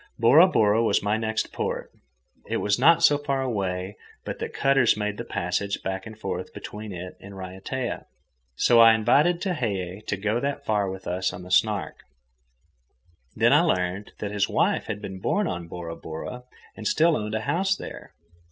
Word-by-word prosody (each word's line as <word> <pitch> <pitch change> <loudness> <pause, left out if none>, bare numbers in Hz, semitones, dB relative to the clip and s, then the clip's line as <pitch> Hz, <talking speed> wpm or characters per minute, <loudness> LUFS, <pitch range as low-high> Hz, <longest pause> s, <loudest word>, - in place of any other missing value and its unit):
Bora 135 +10 +7
Bora 110 - +3
was 100 -3 +2
my 105 +1 +1
next 110 0 -2
port. - - -3 0.6
It - - -1
was 105 +2 0
not 165 +5 +5
so 145 -3 +5
far 140 -2 -1
away 95 -5 -3 0.3
but - - -5
that - - -4
cutters 135 -5 +3
made 105 -1 -2
the - - -4
passage 95 +3 -2
back 95 +2 -4
and 110 0 -10
forth - - -5
between 105 0 -7
it 90 0 -7
and 100 0 -11
Raiatea. 95 +7 -5 0.5
So 120 - +4
I 115 -1 +8
invited 150 +10 +3
Tehei 105 - -2
to 100 - -1
go 105 +4 0
that 140 +1 -3
far 105 -2 +1
with 95 0 -7
us 90 +1 -1
on 90 - -9
the 90 - -11
Snark. 100 +2 +1 1.4
Then - - +4
I - - +6
learned 90 +2 -1
that 105 - -4
his 100 -1 0
wife - - +1
had 105 - -5
been 95 -2 -6
born 205 - 0
on 85 -1 -4
Bora 85 -1 -6
Bora 105 +12 -7 0.3
and 110 - -4
still 165 +1 +3
owned 105 -2 -3
a 110 - -1
house 190 - +1
there. - - -9
105 Hz, 180 wpm, -25 LUFS, 95-125 Hz, 1.4 s, I